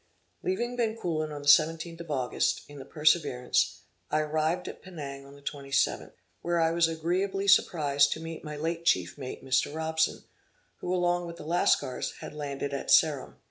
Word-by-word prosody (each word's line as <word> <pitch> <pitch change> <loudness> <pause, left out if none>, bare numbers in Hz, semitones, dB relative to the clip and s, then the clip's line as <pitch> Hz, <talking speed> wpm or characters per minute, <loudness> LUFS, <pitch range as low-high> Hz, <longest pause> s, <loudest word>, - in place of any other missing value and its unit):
Leaving 245 -10 -1
Bencoolen 180 -10 -1
on 145 -1 -6
the - - -7
17th 165 +3 +4
of 170 - -10
August, 130 -4 0
in 145 -1 -11
the 135 - -9
Perseverance, 150 -5 +1 0.3
I 155 - +2
arrived 155 +3 -1
at - - -8
Penang 140 -6 -8
on 140 - -14
the 140 - -17
27th, 140 -1 -1 0.3
where 175 0 0
I 165 0 +3
was 170 0 +3
agreeably 185 +5 -1
surprized 145 -7 +4
to - - -8
meet 165 0 -7
my 150 -1 -6
late 165 +2 -2
chief 90 - +2
mate 135 -1 -7
Mr. 130 +1 +2
Robson, 160 0 0 0.5
who, 180 - -4
along 175 -1 +1
with 170 - -7
the - - -9
Lascars, 160 -5 +1
had - - -8
landed 140 -1 -4
at 140 - -4
Ceram. 150 -4 +4
155 Hz, 175 wpm, -28 LUFS, 145-170 Hz, 0.5 s, 17th